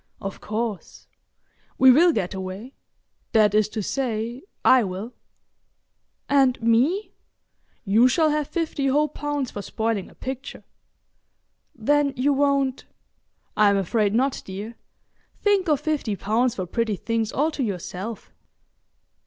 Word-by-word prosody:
"Of 195 0 -6
course. 215 -2 -4 0.7
We 260 -1 +8
will 335 +7 +6
get 200 - -2
away—that 205 +2 -3
is 215 0 +3
to 215 -1 -4
say, 235 0 -3 0.2
I 255 -2 +6
will." 195 +5 -5 1.1
"And 270 -3 +3
me?" 250 - +1 0.7
"You 220 +5 +5
shall 310 +4 +2
have 300 -1 -1
fifty 315 -5 -2
whole 295 +3 +2
pounds 290 -3 -3
for 205 - -5
spoiling 220 -1 -2
a - - -19
picture." 265 +1 -7 1.1
"Then 285 +4 +1
you 280 +3 +2
won't——?" 275 -2 +1 0.7
"I'm 205 -1 +4
afraid 205 +2 +1
not, 265 +3 +1
dear. 205 +5 -7 0.6
Think 405 -3 +2
of 295 -3 +3
fifty 295 -9 -1
pounds 230 +5 0
for 185 - -3
pretty 220 +3 -1
things 225 +3 -2
all 305 +4 +1
to 300 - -5
yourself." 200 0 -5
235 Hz, 125 wpm, -24 LUFS, 210-280 Hz, 1.1 s, We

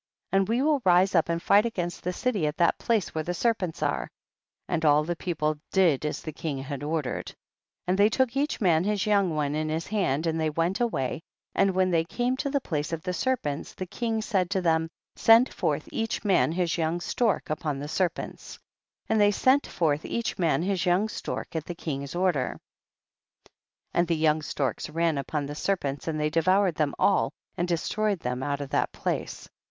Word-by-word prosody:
21. 195 - +4
And 195 - -2
we 240 +4 +2
will 295 -3 +2
rise 185 +1 +4
up 165 -2 +3
and 170 0 0
fight 200 +4 +4
against 180 -7 -3
the 180 - -1
city 205 -5 0
at 150 - -3
the 170 -1 +4
place 225 -5 0
where 155 - -2
the 175 +3 -3
serpents 185 -5 -1
are; - - -1 0.6
and 170 -3 -1
all 150 -1 +5
the 175 +2 -2
people 155 -4 -2
did 165 -7 +3
as - - -4
the 155 - -5
king 155 -2 -4
had 140 +1 -5
ordered. 150 -2 -2
22. - - -9 0.5
And 185 +1 +1
they 205 +1 +6
took 255 +1 +1
each 290 +2 0
man 170 -6 +3
his 210 +1 0
young 200 -6 +2
one 145 -1 0
in 155 +1 -1
his 160 +2 -2
hand, 170 -8 0
and 165 0 0
they 160 -1 +1
went 165 +6 0
away, 165 - -1 0.3
and 195 -1 +2
when 185 0 +2
they 165 -1 +3
came 245 +9 -1
to 280 - -2
the 280 0 +1
place 155 - -3
of 165 -1 -4
the 180 - -2
serpents 175 - -2
the 185 - -4
king 225 +3 -2
said 190 -6 0
to 195 - +1
them, 160 -2 +1 0.3
send 230 +3 +5
forth - - -1
each 225 -1 -2
man 190 -5 +3
his 170 -1 0
young 165 +2 0
stork 215 0 0
upon 150 -2 -2
the 145 +1 -5
serpents. 175 +2 -3 0.5
23. - - -1
And 220 - +3
they 205 - +6
sent 260 +7 +3
forth 150 -3 0
each 235 -3 -3
man 160 -3 +2
his 190 -1 0
young 185 +5 +2
stork - - -5
at 160 -1 -2
the 175 - -6
king's 140 -3 -5
order, 175 -8 0 1.3
and 175 0 +2
the 165 - +1
young 155 0 +2
storks 135 -4 -2
ran 165 -1 0
upon 145 +1 -2
the 145 - -5
serpents 145 -4 -2
and 155 -1 -1
they 150 0 0
devoured 185 +3 +3
them 150 -2 -1
all 200 - +3 0.2
and 175 0 -1
destroyed 195 +3 0
them 125 +1 -3
out 145 +1 -2
of 140 - -6
that - - +1
place. - - -4
170 Hz, 210 wpm, -27 LUFS, 155-200 Hz, 1.3 s, they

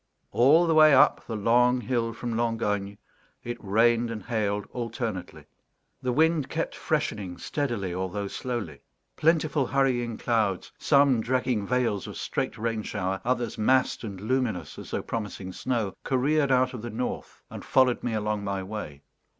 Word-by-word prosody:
All 150 +8 +5
the 165 - +2
way 155 -2 +7
up 130 - +5
the 115 - -3
long 125 +4 +3
hill 120 0 -1
from 115 0 -4
Langogne 105 -4 -1 0.5
it 120 -1 -6
rained 115 +3 +3
and 110 -3 -5
hailed 105 -3 -1
alternately; 115 -6 -5 0.6
the 125 - -1
wind 155 +1 +2
kept - - -2
freshening 95 -5 -2
steadily, 115 - -2
although 95 +2 -3
slowly; 105 - -5 0.3
plentiful 155 -4 +2
hurrying 125 -4 +1
clouds 110 -6 0
some, 140 -5 +4
dragging 125 -3 0
veils 125 -6 0
of - - -7
straight - - -3
rain 115 0 -2
shower, 95 -2 -3
others 120 -2 -1
massed 130 +4 +2
and 100 -4 -6
luminous 110 - -2
as - - -9
though - - -3
promising 105 -4 -5
snow 115 -3 -2
careered 140 +2 +1
out 130 0 +3
of 125 - -6
the 120 - -5
north 120 +3 -5
and - - -8
followed 130 -2 +3
me 120 - -2
along 105 -1 -1
my 100 -1 -2
way. 95 -9 -7
115 Hz, 155 wpm, -27 LUFS, 105-130 Hz, 0.6 s, way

